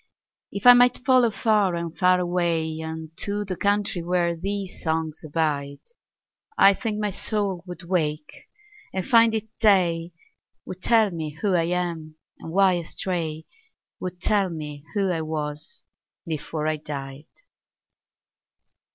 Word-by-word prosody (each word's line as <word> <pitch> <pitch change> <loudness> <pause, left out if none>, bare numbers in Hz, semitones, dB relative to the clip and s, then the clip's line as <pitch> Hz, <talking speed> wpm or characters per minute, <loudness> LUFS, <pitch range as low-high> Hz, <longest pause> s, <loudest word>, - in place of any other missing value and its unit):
If 200 - -6
I 245 - +11
might 245 0 +4
follow 255 -3 +5
far 210 -4 +1
and 170 -1 -4
far 180 0 +4
awayUnto 165 +2 -2
the 185 - -3
country 200 -1 0
where 170 0 0
these 195 +2 -4
songs 160 -1 -2
abide,I 155 - -1
think 215 +1 -3
my 210 -1 -1
soul 195 -3 -2
would 180 0 -8
wake 155 -4 -3 0.4
and 190 -1 -3
find 230 -1 +5
it 220 0 -3
day, 175 -5 +3 0.5
Would 185 0 -8
tell 220 -2 +4
me 155 -3 -5
who 200 +2 +1
I 170 -2 +2
am, 170 -3 -3 0.2
and 165 - -8
why 190 0 +4
I - - -4
stray,—Would 180 - -6
tell 200 -1 +2
me 150 -3 -7
who 195 -2 +1
I 165 -2 -1
was 150 -1 -5 0.4
before 155 -1 -4
I 155 0 0
died. 140 -1 -7
175 Hz, 130 wpm, -24 LUFS, 160-200 Hz, 0.5 s, I